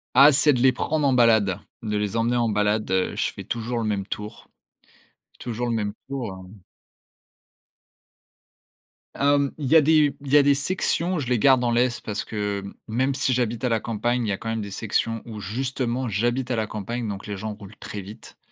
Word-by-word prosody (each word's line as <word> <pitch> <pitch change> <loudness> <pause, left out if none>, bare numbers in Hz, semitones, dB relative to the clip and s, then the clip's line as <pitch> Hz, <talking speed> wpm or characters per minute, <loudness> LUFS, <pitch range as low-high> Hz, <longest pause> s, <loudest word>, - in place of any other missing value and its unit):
Ah, 145 +2 +9
c'est 145 +1 +5
de 125 - -1
les 130 +1 +5
prendre 150 +1 -1
en 135 - +3
balade, 110 -6 +4 0.2
de 105 -2 -2
les 105 +1 -2
emmener 120 +2 +1
en 120 -2 +1
balade, 105 0 0
heu. 95 0 +1
Je - - -1
fais - - -8
toujours 120 +1 -3
le 115 - -2
même 100 -2 -1
tour 105 +1 -7 0.9
toujours 120 0 -3
le - - 0
même 105 -2 -1 0.2
tour, 130 -7 -4 0.2
hem. 100 +1 -15 2.6
Hem, 140 0 +2
il 145 - -4
y 160 - +4
a 160 - +9
des 150 -1 +4
il 140 -1 -7
y 145 - +9
a 145 - +6
des 140 0 +5
sections, 175 +3 0
je 140 - -3
les 125 -2 +1
garde 130 0 +5
en 120 - +1
laisse 120 0 +1
parce 105 -2 -4
que, 105 -2 -3 0.2
même 130 +5 0
si 135 -2 +1
j'habite 120 -1 -1
à 125 - +2
la 115 -1 +1
campagne, 120 +2 -1
il 105 - -2
y - - +1
a 95 - -1
quand 115 - -6
même 115 0 -2
des 100 - -6
sections 115 +2 -1
où 110 -2 -8
justement 125 +4 -2
j'habite 120 +5 -1
à - - +1
la 110 -2 -1
campagne, 110 +3 -4
donc 100 -1 -5
les 105 - -4
gens 105 +2 -5
roulent 105 0 -13
très 105 - -6
vite. 100 +3 -12
115 Hz, 215 wpm, -24 LUFS, 105-130 Hz, 2.6 s, Ah